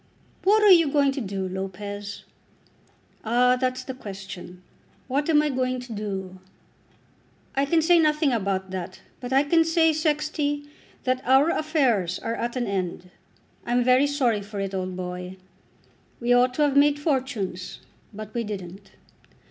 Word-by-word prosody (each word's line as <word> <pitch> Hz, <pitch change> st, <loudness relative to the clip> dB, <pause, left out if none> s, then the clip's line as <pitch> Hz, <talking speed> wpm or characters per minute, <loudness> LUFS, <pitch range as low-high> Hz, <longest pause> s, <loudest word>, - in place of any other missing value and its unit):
"What 420 Hz, +3 st, +4 dB
are 415 Hz, -, +7 dB
you 335 Hz, -4 st, +7 dB
going 280 Hz, -1 st, +3 dB
to 270 Hz, 0 st, -4 dB
do, 195 Hz, -3 st, -3 dB
Lopez?" 195 Hz, +2 st, -6 dB, 1.0 s
"Ah; 245 Hz, +3 st, +3 dB
that's 255 Hz, 0 st, -2 dB
the 260 Hz, -, -6 dB
question. 195 Hz, -5 st, -9 dB, 0.4 s
What 285 Hz, +4 st, -1 dB
am 300 Hz, -2 st, +5 dB
I 300 Hz, -, 0 dB
going 255 Hz, -1 st, -1 dB
to 245 Hz, -2 st, -8 dB
do? 190 Hz, -3 st, -5 dB, 1.2 s
I 275 Hz, +1 st, +2 dB
can 320 Hz, +3 st, +2 dB
say 345 Hz, +1 st, +5 dB
nothing 300 Hz, -3 st, +2 dB
about 190 Hz, -3 st, -2 dB
that, 185 Hz, 0 st, -6 dB, 0.2 s
but 245 Hz, 0 st, -7 dB
I 270 Hz, +2 st, +4 dB
can 330 Hz, +3 st, +3 dB
say, 325 Hz, -1 st, +3 dB
Sexty, 300 Hz, -1 st, -1 dB, 0.4 s
that 255 Hz, 0 st, 0 dB
our 270 Hz, +5 st, +4 dB
affairs 260 Hz, -, +1 dB
are 230 Hz, -, -4 dB
at 235 Hz, +1 st, -3 dB
an 250 Hz, -1 st, -1 dB
end. 180 Hz, -3 st, -4 dB, 0.5 s
I'm 245 Hz, +1 st, +1 dB
very 255 Hz, +3 st, +4 dB
sorry 250 Hz, -7 st, +1 dB
for 205 Hz, 0 st, -7 dB
it, 195 Hz, 0 st, -3 dB
old 185 Hz, -1 st, -3 dB
boy. 180 Hz, 0 st, -6 dB, 0.8 s
We 245 Hz, 0 st, +2 dB
ought 250 Hz, +1 st, +3 dB
to 300 Hz, -, +2 dB
have 285 Hz, -2 st, +1 dB
made 290 Hz, +1 st, +5 dB
fortunes, 255 Hz, -, -2 dB, 0.3 s
but 215 Hz, 0 st, -9 dB
we 235 Hz, -, -1 dB
didn't. 195 Hz, -2 st, -8 dB
245 Hz, 155 wpm, -25 LUFS, 195-285 Hz, 1.2 s, are